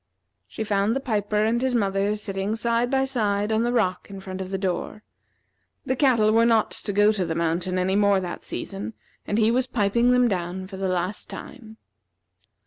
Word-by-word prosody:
She 220 - -5
found 205 +1 +1
the - - 0
piper 210 -5 0
and 230 +2 +1
his 260 -1 0
mother 200 -1 +1
sitting 200 0 -3
side 235 +1 0
by 270 0 +2
side 210 -5 0
on 220 0 +2
the 240 +1 +1
rock 185 -7 0
in 195 -1 -8
front 190 0 -6
of 185 - -5
the 195 - -2
door. 190 +3 -3 0.8
The 260 - 0
cattle 240 -6 +3
were 230 +1 +5
not 230 -2 +3
to 205 - -4
go 205 +1 +4
to 205 -4 -1
the 165 -2 -3
mountain 170 +2 -1
any 185 +1 +1
more 200 -1 +4
that 180 -2 -6
season, 200 +2 -5 0.3
and 205 - 0
he 220 0 +4
was 255 +1 +1
piping 235 0 +2
them 250 0 +4
down 185 -2 -3
for 190 0 -9
the 190 0 -2
last 185 +2 -2
time. 225 -5 -10
210 Hz, 200 wpm, -24 LUFS, 190-230 Hz, 0.8 s, were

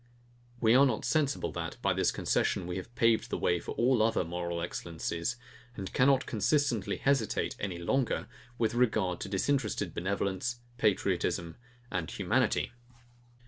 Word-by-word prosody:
We 115 -1 +4
are 135 +3 +7
not 120 -4 -1
sensible 145 -3 +1
that, - - -5
by - - +3
this - - +2
concession, 90 - 0
we 90 +1 -3
have 105 +6 -8
paved 115 -1 +3
the - - -1
way 90 0 +1
for - - -6
all 125 +1 +3
the 110 - +5
other 115 - +1
moral 85 0 -3
excellencies, 85 +3 -3 0.4
and 95 -4 -6
cannot 135 +1 +4
consistently 120 -1 +1
hesitate 135 -6 +1
any 95 -4 -3
longer, 125 +9 0 0.3
with 115 -1 +1
regard 110 -7 +1
to - - -4
disinterested 105 -2 0
benevolence, 100 +5 -2 0.2
patriotism, 90 -5 +1 0.4
and 85 -3 -2
humanity. - - +1
110 Hz, 145 wpm, -30 LUFS, 90-125 Hz, 0.4 s, are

